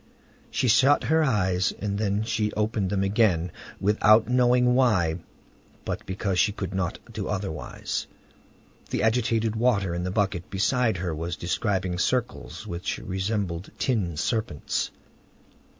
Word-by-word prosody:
She 130 - 0
shut 135 +5 +5
her 160 0 +3
eyes; 95 -8 +1
then 100 0 -1
she 110 -1 -1
opened 105 -2 0
them 100 0 0
again, 95 -4 +2 0.3
without 105 +2 +4
knowing 125 0 +4
why, 95 -11 +2 0.7
but - - -4
because 95 -1 -1
she 105 - +4
could 95 -2 -5
not 95 -2 -1 0.2
do - - -4
otherwise. 85 -10 -4 0.8
The - - -1
agitated 115 -1 +1
water 110 -6 +1
in 85 +1 -2
the 90 - -2
bucket 95 -3 -1
beside 110 +2 +1
her 85 -1 -2
was 85 +2 -3
describing 95 0 -1
circles 125 +4 -2
which 85 +1 -3
resembled 95 -2 -3
tin 100 - 0
serpents. 110 - -1
100 Hz, 130 wpm, -26 LUFS, 90-115 Hz, 0.8 s, shut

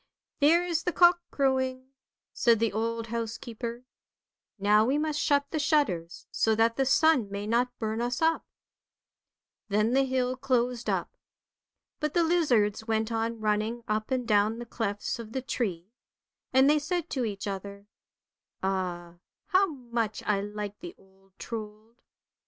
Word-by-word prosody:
' - - -57
There 330 +5 +5
is 335 -2 0
the 355 - -1
cock 345 0 +5
crowing! 260 -1 0 0.2
" - - -65
said 235 -2 +4
the 225 -1 0
old 230 +1 -2
housekeeper. 235 +1 -5 0.4
" - - -65 0.3
Now 210 +2 +4
we 260 +6 +1
must 305 0 -1
shut 285 -1 +2
the 310 - -1
shutters, 270 - 0
so 220 -1 +2
that 230 +1 +3
the 270 -1 +1
sun 275 -5 +4
may 200 +1 -4
not 245 +3 0
burn 220 0 -2
us 245 +1 -1
up." 325 0 +2 1.3
Then 215 +3 +2
the 270 - +4
hill 255 -1 0
closed 250 -2 0
up. - - -2 0.8
But 300 +1 -2
the 345 - +4
lizards 245 - +2
went 220 0 0
on 225 0 -2
running 215 +2 0
up 215 0 -1
and 255 -3 -1
down 210 +1 +3
the 240 - -6
clefts 220 -2 -3
of 225 -1 -8
the 260 - -2
tree; 195 -8 -3 0.6
and 265 +1 +5
they 300 +1 +4
said 340 +2 -2
to 260 - -1
each 205 -3 -4
other, 200 0 -6 0.4
" - - -51
Ah, 175 -3 -2 0.3
how 390 0 +4
much 235 - -3
I 200 -2 +1
liked 205 0 -6
the 350 0 -9
old 195 0 -26
Trold." 220 +1 -8
230 Hz, 165 wpm, -28 LUFS, 210-270 Hz, 1.3 s, There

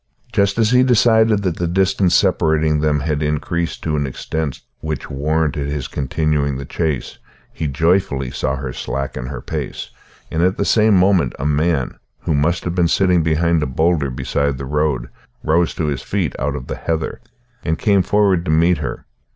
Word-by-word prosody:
Just 100 +1 +2
as 115 0 +3
he 125 0 +5
decided 110 -4 +4
that 90 -4 -1
the 85 - -1
distance 95 +1 +2
separating 80 -5 +2
them 75 -1 +1
had 75 0 -1
increased 75 +3 -2
to 80 -1 -1
an 70 -2 0
extent 75 +2 -4 0.2
which 75 -3 -5
warranted 75 0 0
his 70 -2 -3
continuing 70 0 -1
the 70 - -6
chase, 80 -4 -3 0.3
he 80 - -3
joyfully 70 -3 +1
saw 65 - -1
her 65 -2 -5
slacken 65 -1 -4
her - - -6
pace, - - -5 0.4
and 80 - 0
at 95 +2 +2
the 100 - 0
same 110 -2 +4
moment 90 -8 +3
a 70 - -4
man, 75 -2 0 0.2
who 80 - -1
must 80 +4 +1
have 85 - -2
been 90 -1 +2
sitting 90 0 +3
behind 80 +1 +2
a 75 - 0
boulder 80 +2 +1
beside 70 +2 -1
the 70 - -5
road, 75 -3 0 0.4
rose 85 +2 +2
to 80 - -1
his 70 -3 -2
feet 95 -2 -2
out 70 +2 -1
of 70 -3 -6
the - - -5
heather, 80 -1 -3 0.4
and 80 - 0
came 100 -3 +3
forward 100 -3 +2
to - - -3
meet 85 +3 +3
her. - - -5
80 Hz, 185 wpm, -19 LUFS, 70-90 Hz, 0.4 s, he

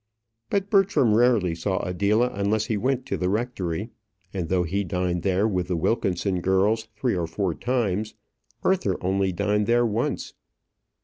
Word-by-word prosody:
But 200 0 -1
Bertram 195 - +4
rarely 110 -6 +3
saw 95 +3 -2
Adela 100 +7 +1
unless 100 +2 0
he 110 - -1
went 130 +4 0
to - - -2
the 90 - 0
rectory, 105 -2 -2 0.4
and 90 -4 -3
though 90 -1 +2
he 95 +4 -1
dined 90 -2 -1
there 95 +3 +2
with 90 -4 -1
the 90 - -1
Wilkinson 95 0 0
girls 100 +5 +2
three 115 +1 0
or 85 -2 -1
four 90 +1 -1
times, 110 -2 -1 0.5
Arthur 140 - +1
only 95 +1 +1
dined 105 +3 0
there 120 +1 +3
once. 110 0 -2
100 Hz, 160 wpm, -25 LUFS, 90-115 Hz, 0.5 s, Bertram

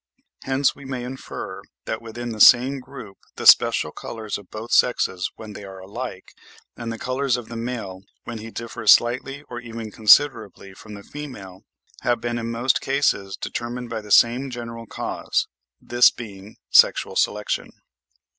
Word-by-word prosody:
Hence 135 +1 +1
we 140 - -13
may 130 -2 -5
infer 130 +2 -7 0.2
that 110 - -4
within 120 +1 -7
the 110 -2 -4
same 130 +3 +7
group 125 -6 -11 0.2
the - - -6
special - - +6
colours 110 -3 -6
of 100 - -17
both 110 +2 -8
sexes 95 -7 +2
when 110 -1 -10
they 105 - -9
are 95 -1 -10
alike, 95 +1 -8 0.4
and 115 -1 -5
the 115 - -5
colours 130 0 -1
of 120 -2 -9
the 115 - -7
male, 115 -6 -5 0.2
when 115 -2 -7
he 110 +1 -8
differs 115 0 +1
slightly 130 +4 +2
or 120 -4 -8
even 115 -2 -8
considerably 110 -3 +3
from 105 +2 -11
the 100 - -11
female, 105 -12 -9 0.4
have 120 -1 0
been 120 +1 -3
in 115 0 -4
most 120 +3 +1
cases 135 -8 0
determined 120 0 -5
by 110 -1 -3
the 105 - -13
same 120 +6 +4
general 115 -2 -7
cause; - - -2 0.3
this 120 +1 +5
being 105 -3 -11
sexual - - +5
selection. 105 0 0
115 Hz, 165 wpm, -23 LUFS, 105-125 Hz, 0.4 s, same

